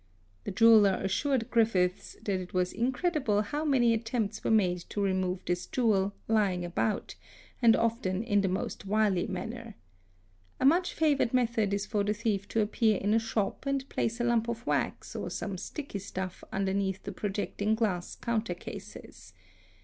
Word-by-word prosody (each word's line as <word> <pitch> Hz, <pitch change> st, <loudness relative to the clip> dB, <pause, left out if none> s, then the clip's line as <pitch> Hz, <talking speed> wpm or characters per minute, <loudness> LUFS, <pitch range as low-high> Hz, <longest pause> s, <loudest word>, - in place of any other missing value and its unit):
The -, -, -3 dB
jeweller 210 Hz, -2 st, +6 dB
assured 230 Hz, +5 st, 0 dB
Griffiths 190 Hz, -6 st, +1 dB
that 195 Hz, -3 st, 0 dB
it 180 Hz, 0 st, -9 dB
was 180 Hz, 0 st, +1 dB
incredible 255 Hz, -, +1 dB
how 295 Hz, +8 st, -3 dB
many 255 Hz, -6 st, +3 dB
attempts 225 Hz, -2 st, -2 dB
were -, -, 0 dB
made 185 Hz, -5 st, +3 dB
to -, -, -4 dB
remove 185 Hz, -2 st, 0 dB
this 175 Hz, 0 st, -2 dB
jewel 205 Hz, -5 st, +1 dB
'lying 200 Hz, -5 st, +1 dB
about'', 190 Hz, +5 st, -1 dB, 0.5 s
and 230 Hz, -2 st, +6 dB
often 220 Hz, -4 st, 0 dB
in 205 Hz, -3 st, +2 dB
the 195 Hz, -, +1 dB
most 190 Hz, +2 st, -3 dB
wily 205 Hz, -3 st, +2 dB
manner. 220 Hz, +4 st, -6 dB, 0.8 s
A -, -, +1 dB
much 345 Hz, +6 st, +3 dB
favoured 285 Hz, -6 st, +2 dB
method 230 Hz, -4 st, +1 dB
is 200 Hz, 0 st, -1 dB
for 210 Hz, -1 st, -1 dB
a 205 Hz, +1 st, +1 dB
thief 205 Hz, -3 st, -1 dB
to 225 Hz, -, +1 dB
appear 215 Hz, 0 st, +2 dB
in 205 Hz, +3 st, 0 dB
a 225 Hz, -, +4 dB
shop 225 Hz, +3 st, -2 dB
and 275 Hz, -1 st, -1 dB
place 230 Hz, +2 st, -1 dB
a -, -, 0 dB
lump 240 Hz, -1 st, +2 dB
of 235 Hz, +1 st, -4 dB
wax -, -, -2 dB
or -, -, -3 dB
some 200 Hz, -3 st, -4 dB
sticky 280 Hz, -, -6 dB
stuff 190 Hz, -1 st, -6 dB
underneath 195 Hz, 0 st, -1 dB
the -, -, -5 dB
projecting 205 Hz, +1 st, -1 dB
glass 200 Hz, -6 st, -1 dB
counter 235 Hz, -1 st, -2 dB
cases. -, -, -10 dB
215 Hz, 165 wpm, -29 LUFS, 195-235 Hz, 0.8 s, jeweller